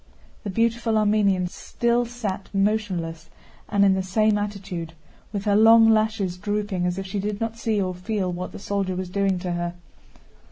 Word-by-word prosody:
The 205 - -4
beautiful 230 +2 +1
Armenian 205 -3 +2
still 235 +6 -1
sat 215 -5 -5
motionless 185 -6 -1 0.4
and 200 -1 +3
in 195 - +5
the 190 - 0
same 215 +3 +2
attitude, 195 -5 -4 0.4
with 200 -1 -4
her 205 -1 +3
long 225 +1 +7
lashes 215 -4 +1
drooping 205 -2 -1
as 180 +1 -2
if 195 - -4
she 195 +2 -3
did 205 +1 -3
not 225 0 -2
see 220 -3 0
or 185 -2 -1
feel 185 +1 -2
what 180 +1 -5
the - - -9
soldier 195 -2 -2
was 185 0 -4
doing 195 -1 +1
to 180 0 -4
her. 175 0 -3
200 Hz, 175 wpm, -24 LUFS, 185-215 Hz, 0.4 s, long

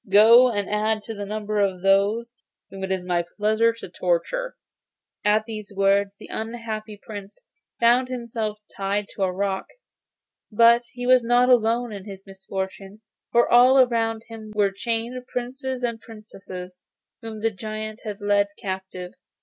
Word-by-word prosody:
Go, 230 +5 +8
and 205 -3 -2
add 215 +1 0
to 225 - -6
the 205 -1 -6
number 210 0 -2
of 190 -3 0
those 205 +5 +2 0.4
whom 195 0 -7
it 190 - -3
is 190 -1 -1
my 175 -1 0
pleasure 220 +2 +3
to 230 - -9
torture.' - - -1 0.7
At 210 +1 +3
these 215 -2 -7
words 195 0 +2
the - - -12
unhappy 220 -2 -5
Prince 205 - -10 0.4
found 240 +2 +4
himself 235 -4 -4 0.2
tied 200 +1 -2
to - - -9
a 190 -1 +2
rock; 190 +1 -2 0.8
but 235 +2 +5
he 245 0 -5
was 255 -1 +5
not 245 +2 +4
alone 235 0 +3
in 200 -2 -8
his 195 -2 -10
misfortunes, 195 +1 -6 0.3
for 235 0 +4
all 255 +2 +7
round 225 -2 -1
him 220 -2 -9
were 205 -2 +3
chained 230 +4 -3
Princes 255 +1 -4
and 230 -2 -2
Princesses, 185 -5 -10 0.4
whom 220 -2 -7
the 225 +1 +1
giant 215 +1 -6
had 210 -2 -6
led 205 0 +3
captive. 190 -2 -6
215 Hz, 155 wpm, -24 LUFS, 200-235 Hz, 0.8 s, Go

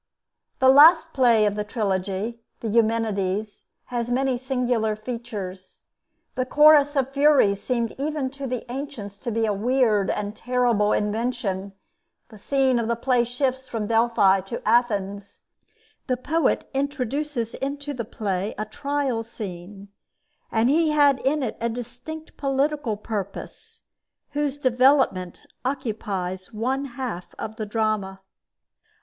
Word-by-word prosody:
The 260 - +5
last 310 +5 +7
play 235 -5 +4
of 205 - +1
the 210 0 -2
trilogy, 205 +1 -2 0.2
the 230 - -3
'Eumenides,' 215 -2 0 0.3
has 240 -1 -1
many 260 +1 +1
singular 245 -4 0
features. 215 -5 -7 0.5
The 255 - 0
Chorus 295 +2 +5
of 270 -1 +1
Furies 275 -9 +4
seemed 235 -3 -1
even 290 -2 -2
to 280 0 -6
the 250 -1 -4
ancients 250 -7 -6
to 245 - -4
be 225 +1 +1
a 210 - +1
weird 220 -1 +2
and 210 0 -2
terrible 240 -3 +1
invention; 210 -3 -1 0.6
the 215 -3 -14
scene 265 +1 +2
of 230 - -1
the 235 - +1
play 245 0 +2
shifts 260 +2 -2
from 225 -4 -3
Delphi 225 -4 +3
to 195 +5 -7
Athens; 205 -4 0 0.6
the 255 -2 0
poet 320 +6 0
introduces 275 -2 -2
into 285 +1 -4
the 245 -3 -4
play 200 -2 -3
a 215 - -2
trial 275 +1 -2
scene; 200 -3 -8 0.6
and 225 +1 +2
he 320 +1 +3
had 290 -3 +4
in 285 +2 0
it 230 - -3
a 235 - 0
distinct 250 +7 -8
political 275 -4 0
purpose, 210 -2 -7 0.5
whose 290 -1 -1
development 255 -8 +2 0.2
occupies 210 -8 -3
one 255 +5 -1
half 240 -8 -6
of 220 0 -6
the 215 -2 -4
drama. 210 -3 -1
235 Hz, 130 wpm, -24 LUFS, 210-270 Hz, 0.6 s, last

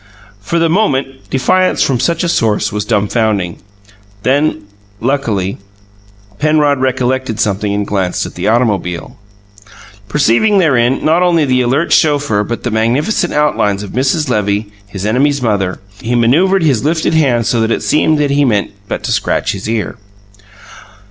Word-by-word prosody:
For 105 +12 -2
the 165 0 +2
moment, 135 -8 -1
defiance 185 +8 +2
from 130 -3 0
such 170 +7 0
a - - 0
source 105 -8 0
was 105 -1 -3
dumfounding. 105 -4 0 0.7
Then, 140 -4 +1 0.4
luckily, 115 -7 -1 0.8
Penrod 150 -2 +2
recollected 130 -2 -1
something 100 0 0
and 100 0 -1
glanced 95 -3 -1
at - - -8
the - - -3
automobile. 105 -7 -1 0.9
Perceiving 150 - +2
therein 130 -8 +2
not 160 +3 +3
only 170 -4 +3
the 130 -1 +2
alert 135 +7 +1
chauffeur 145 -9 +2
but 120 +3 -5
the 120 - -2
magnificent 130 - 0
outlines 105 -9 0
of 100 - -8
Mrs. 135 +5 0
Levy, 105 -2 -1 0.2
his 100 -1 -6
enemy's 140 +6 +1
mother, 100 -5 -1 0.2
he 120 +2 -1
manoeuvred 165 +11 +3
his 135 -8 +1
lifted 160 +2 0
hand 130 -7 +2
so 115 0 +1
that 110 - +1
it - - -1
seemed 155 +1 +2
he 145 -1 +1
had 140 - +3
but 100 -1 -3
meant - - -9
to - - -2
scratch - - 0
his 100 +2 -5
ear. 115 +1 -2
125 Hz, 155 wpm, -14 LUFS, 105-150 Hz, 0.9 s, not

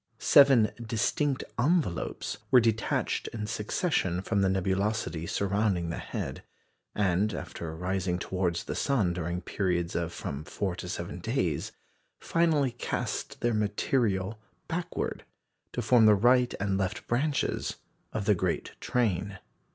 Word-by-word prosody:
Seven 135 -6 +6
distinct 130 +5 0 0.2
"envelopes" 140 - 0
were 130 - +7
detached 110 -2 0
in 105 -2 -4
succession 105 - -1
from 100 0 +1
the 95 - +3
nebulosity 95 -3 0
surrounding 100 -4 0
the - - -4
head, - - -5 0.5
and 100 +1 +1
after 80 -1 -6
rising 90 +1 -1
towards 90 -1 -1
the - - -4
sun 110 -11 +1
during 85 +1 -3
periods 90 -3 -1
of 85 -1 -1
from 70 -2 -5
four 90 +5 -3
to 90 - -6
seven - - -4
days, - - -1 0.5
finally 160 -6 +2
cast 120 +3 -3
their 120 -1 +2
material 105 -1 0 0.3
backward 175 +1 -3 0.5
to 120 - -3
form 115 -1 +6
the 105 - +7
right 125 +4 +4
and 100 -1 0
left 95 +3 -2
branches 140 +5 0 0.4
of 105 -2 -3
the 105 - +5
great 90 -2 -1
train. 100 -5 0
105 Hz, 130 wpm, -29 LUFS, 90-120 Hz, 0.5 s, were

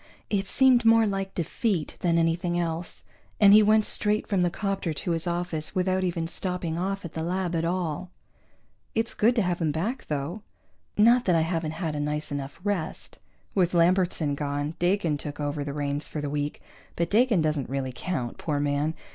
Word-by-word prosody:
It 195 -2 0
seemed 255 +1 +4
more 225 0 +6
like 195 -2 -3
defeat 175 0 -1
than 170 -2 +2
anything 170 +1 +1
else, 170 0 -3 0.4
and 200 -1 +8
he 215 - +9
went 215 0 +4
straight 210 0 +1
from 195 -3 0
the 175 - +3
'copter 195 -3 -2
to 175 - -3
his 165 +1 -1
office 175 -1 -3
without 185 0 +1
even 170 -2 -1
stopping 175 -1 -2
off 195 +2 -2
at 165 - -7
the 160 - -3
lab 175 +1 -1
at 165 0 0
all. 180 0 -2 0.9
It's 225 +1 0
good 235 +3 +3
to 225 - +2
have 175 -1 -1
him 155 -2 +2
back, 210 - -3
though! 150 +7 -3 0.6
Not 235 +4 +5
that 180 - +3
I 165 - +4
haven't 165 -1 -1
had 160 -2 -3
a - - -2
nice 150 +1 -2
enough 140 +1 -5
rest. 200 -6 -3 0.3
With 180 -2 +2
Lambertson 175 -3 +3
gone, 145 +1 -2
Dakin 175 -4 +1
took 145 0 -6
over 145 0 -2
the 140 - -4
reins 145 0 -2
for 155 - -5
the 145 -1 -3
week, 145 0 -3 0.3
but 170 0 -1
Dakin 220 -5 +4
doesn't 150 -4 -1
really 130 -1 -2
count, 130 -5 -4
poor 150 -3 -1
man. 145 +2 0
170 Hz, 190 wpm, -26 LUFS, 150-195 Hz, 0.9 s, he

